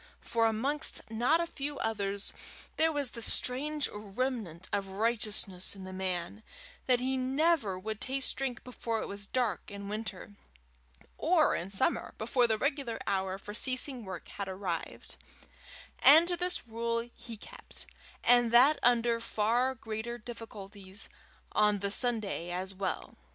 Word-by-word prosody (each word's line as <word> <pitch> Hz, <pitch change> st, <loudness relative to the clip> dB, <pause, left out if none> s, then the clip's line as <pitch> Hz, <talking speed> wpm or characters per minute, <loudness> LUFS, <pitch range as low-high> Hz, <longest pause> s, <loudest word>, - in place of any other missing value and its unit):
For, 230 Hz, -1 st, +2 dB
amongst 260 Hz, +3 st, 0 dB
not 245 Hz, +9 st, +3 dB
a -, -, +1 dB
few 290 Hz, -3 st, -5 dB
others, 200 Hz, -2 st, -1 dB, 0.4 s
there 320 Hz, 0 st, +4 dB
was 285 Hz, -4 st, -2 dB
this 230 Hz, -2 st, +1 dB
strange 290 Hz, +4 st, 0 dB
remnant 210 Hz, -4 st, -3 dB
of 200 Hz, -1 st, 0 dB
righteousness 205 Hz, -2 st, 0 dB
in 195 Hz, -, -9 dB
the 185 Hz, 0 st, -7 dB
man, 185 Hz, +1 st, -3 dB, 0.5 s
that 250 Hz, -2 st, +5 dB
he 260 Hz, +1 st, 0 dB
never 265 Hz, -, +2 dB
would 215 Hz, +3 st, -5 dB
taste 265 Hz, 0 st, 0 dB
drink 265 Hz, -3 st, -3 dB
before 230 Hz, -2 st, -3 dB
it -, -, -5 dB
was 200 Hz, 0 st, -7 dB
dark 235 Hz, -6 st, -1 dB
in 200 Hz, -1 st, -7 dB
winter, 210 Hz, -2 st, -5 dB, 0.9 s
or 320 Hz, -1 st, +4 dB
in 175 Hz, -, -2 dB
summer 195 Hz, -, +1 dB
before 240 Hz, +2 st, +2 dB
the 220 Hz, -1 st, +2 dB
regular 275 Hz, -3 st, -1 dB
hour 190 Hz, -1 st, 0 dB
for 205 Hz, +1 st, -8 dB
ceasing 255 Hz, +2 st, +1 dB
work 185 Hz, -3 st, -7 dB
had 200 Hz, -, -5 dB
arrived; 185 Hz, -3 st, -4 dB, 0.8 s
and 320 Hz, +4 st, +8 dB
to 355 Hz, -, +1 dB
this 360 Hz, -2 st, 0 dB
rule 230 Hz, +1 st, -2 dB
he 230 Hz, -2 st, -9 dB
kept, -, -, -9 dB, 0.4 s
and 240 Hz, -1 st, +6 dB
that 260 Hz, +6 st, +7 dB
under 235 Hz, -1 st, +4 dB
far 235 Hz, +4 st, +1 dB
greater 225 Hz, +1 st, -4 dB
difficulties, 205 Hz, -4 st, -8 dB, 0.4 s
on 210 Hz, -1 st, +4 dB
the 200 Hz, 0 st, -2 dB
Sunday 220 Hz, -7 st, 0 dB
as 185 Hz, +2 st, -3 dB
well. 190 Hz, 0 st, -3 dB
225 Hz, 145 wpm, -31 LUFS, 200-255 Hz, 0.9 s, and